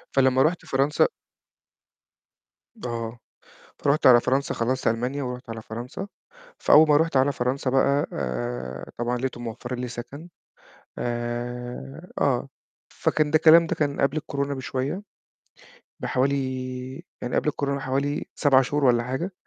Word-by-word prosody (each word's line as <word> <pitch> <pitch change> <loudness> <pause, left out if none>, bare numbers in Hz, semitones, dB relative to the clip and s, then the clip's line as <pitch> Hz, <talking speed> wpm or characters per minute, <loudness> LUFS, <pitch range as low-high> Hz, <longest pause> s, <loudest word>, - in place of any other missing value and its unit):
فلمّا 130 -1 +4
رُحت 165 +3 0
فرنسا 140 +3 +2 1.8
آه، 115 -1 -4 0.7
رُحت 145 +1 +4
على 120 -2 +8
فرنسا 135 +3 0
خلّصت 130 +3 -1
ألمانيا 125 +5 0
ورُحت 125 -1 -6
على 115 -1 -5
فرنسا، 120 - -6 0.5
فأول 155 +1 +7
ما 145 - +6
رُحت 160 -3 +2
على 135 +2 +4
فرنسا 130 +1 -1
بقى 140 +2 +2
آآ، 60 +1 -4
طبعًا 120 +1 -1
لقيتهم 120 -1 -4
موفّرين 120 +2 -5
لي 125 - -3
سكن، 125 +7 -8 0.7
آآ، 120 - -4
آه، - - +1 0.4
فكان 150 -1 +1
ده - - +2
الكلام 165 +1 +7
ده - - -1
كان 145 -2 -1
قبل 140 +3 +2
الكورونا 140 -2 -2
بشوية 135 +6 -3 1.0
بحوالي 135 +2 +1 0.9
يعني 125 - -2
قبل - - +1
الكورونا 140 -1 -1
حوالي 135 +2 -1
7 135 -3 +4
شهور 145 +3 -1
والّا 120 -2 +4
حاجة. 130 +10 -3
130 Hz, 135 wpm, -25 LUFS, 120-140 Hz, 1.8 s, على